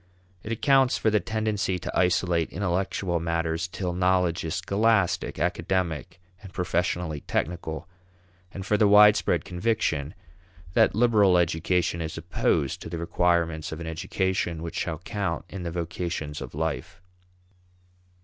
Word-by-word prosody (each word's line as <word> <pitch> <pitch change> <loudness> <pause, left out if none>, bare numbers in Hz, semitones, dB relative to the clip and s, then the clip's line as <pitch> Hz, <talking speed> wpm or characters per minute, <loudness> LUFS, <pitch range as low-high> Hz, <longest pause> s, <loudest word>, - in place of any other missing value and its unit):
It 105 - -7
accounts 135 +2 +3
for 110 - +1
the 105 - +3
tendency 110 -3 -1
to 85 - -6
isolate 90 -2 +2
intellectual 90 -1 -1
matters 85 0 -1
till 90 0 -4
knowledge 90 -1 +1
is 80 +1 -3
scholastic, 100 +1 +1
academic, 85 -5 -1 0.2
and 100 -2 -11
professionally 90 -3 -1
technical, 80 -1 -3 0.6
and 95 -1 -7
for 105 - +2
the 105 - +4
widespread 105 +1 +5
conviction 90 -7 -1 0.6
that - - +4
liberal 105 -5 +4
education 85 0 +1
is 80 -1 -5
opposed 70 - 0
to - - -7
the 85 - -4
requirements 85 -1 0
of 80 - -6
an 85 - -6
education 85 +1 -2
which 85 - -4
shall 80 -2 -2
count 95 -1 -3
in 95 - -7
the 85 - -3
vocations 85 -3 -4
of 65 0 -8
life. 80 +2 -3
90 Hz, 135 wpm, -26 LUFS, 85-100 Hz, 0.6 s, widespread